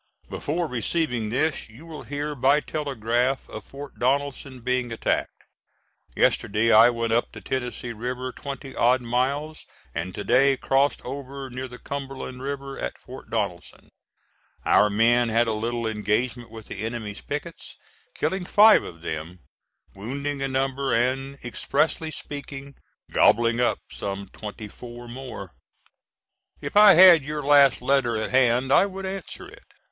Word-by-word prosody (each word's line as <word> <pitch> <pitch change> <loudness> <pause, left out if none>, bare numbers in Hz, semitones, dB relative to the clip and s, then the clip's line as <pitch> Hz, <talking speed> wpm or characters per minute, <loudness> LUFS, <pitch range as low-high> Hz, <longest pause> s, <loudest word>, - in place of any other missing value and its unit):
Before 170 +4 -2
receiving 125 -2 -1
this 135 +2 -1
you 120 +9 -14
will 160 -2 -8
hear 145 +1 -4
by 140 +2 +3
telegraph 130 -4 -1
of - - -8
Fort 140 +1 -11
Donelson 135 0 -1
being 125 0 -1
attacked. 115 - -2 0.7
Yesterday 110 +3 +2
I 110 +2 +8
went 115 -1 -1
up 120 - +1
the - - -9
Tennessee 125 -2 -4
River 125 +3 -4
twenty 135 0 -8
odd 125 +2 +3
miles, 140 +6 -2 0.3
and 85 +3 -4
to 105 - -4
day 135 +4 +4
crossed 135 +2 +1
over 135 0 -7
near 130 +2 -5
the 125 0 -11
Cumberland 135 -2 -6
River 140 0 -5
at - - -4
Fort 130 +1 -12
Donelson. 100 -6 -4 0.8
Our 105 - +5
men 115 +3 +3
had 115 +1 +2
a 110 - +1
little 115 +2 -2
engagement 110 +3 -1
with 110 -1 -11
the - - -8
enemy's 110 -2 -5
pickets, 155 +3 -7 0.4
killing 190 -1 -1
five 210 +3 +7
of 85 -1 -11
them, 80 +2 -6 0.5
wounding 140 +7 -4
a 135 - 0
number, 135 0 0
and, 135 +3 0
expressively 150 +6 -1
speaking, 140 -2 -8 0.4
"gobbling 115 +1 +4
up" 120 - +2
some 100 -1 -5
twenty 105 0 -8
four 120 +3 -11
more. 120 -6 -8 1.1
If - - -7
I 205 -2 +9
had 175 -3 +9
your 150 +1 -4
last 140 -2 +5
letter 130 -4 +2
at 110 - -3
hand 130 +1 +3
I 200 - +5
would 195 0 -7
answer 190 0 -6
it. - - -15
130 Hz, 145 wpm, -25 LUFS, 115-140 Hz, 1.1 s, I